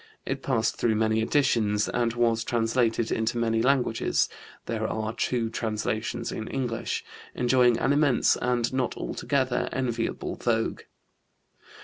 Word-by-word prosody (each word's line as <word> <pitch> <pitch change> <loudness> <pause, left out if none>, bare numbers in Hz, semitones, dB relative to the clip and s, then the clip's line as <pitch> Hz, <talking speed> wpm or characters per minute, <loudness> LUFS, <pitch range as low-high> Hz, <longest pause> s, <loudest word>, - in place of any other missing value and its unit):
It - - -3
passed - - 0
through 115 -2 +1
many 110 0 +2
editions 110 -6 +2
and 120 -1 0
was 115 -1 +2
translated 115 -1 +1
into 115 +1 0
many 115 -1 +1
languages 125 -3 +2 0.4
(there 110 -1 -2
are 110 0 -3
two 120 -1 0
translations 110 +1 -2
in 110 - -5
English), 125 -4 -3 0.3
enjoying 125 -1 +4
an 140 - +2
immense 145 -4 +3
and 125 0 0
not 130 -2 -1
altogether 130 -3 -1
enviable 120 -3 -2
vogue. 115 -2 0
115 Hz, 125 wpm, -27 LUFS, 110-125 Hz, 0.4 s, enjoying